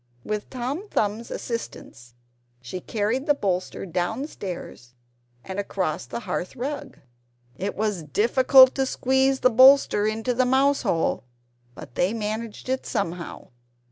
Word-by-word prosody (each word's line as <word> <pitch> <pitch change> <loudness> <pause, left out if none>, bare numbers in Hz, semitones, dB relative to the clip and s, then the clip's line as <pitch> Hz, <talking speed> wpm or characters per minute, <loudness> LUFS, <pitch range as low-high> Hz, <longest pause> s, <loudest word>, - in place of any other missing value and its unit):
With 210 -1 -4
Tom 270 - -4
Thumbs's 215 +2 -1
assistance 120 - -7 0.4
she 125 +9 -7
carried 220 +8 -2
the 290 - +4
bolster 185 -6 -2
downstairs, 180 - -5 0.5
and 190 +1 -5
across 185 -9 -2
the 235 - -5
hearth 185 -1 -4
rug. 280 +2 -5 0.6
It 195 +8 -4
was 210 -4 -1
difficult 255 - +5
to 270 -1 0
squeeze 265 +1 +1
the 255 - +4
bolster 260 -4 +6
into 225 +3 -1
the 255 +2 +2
mouse 275 +2 +3
hole; 165 - 0 0.5
but - - -11
they 190 - 0
managed 220 +1 -4
it 260 0 -1
somehow. 175 -3 -4
220 Hz, 130 wpm, -24 LUFS, 185-260 Hz, 0.6 s, bolster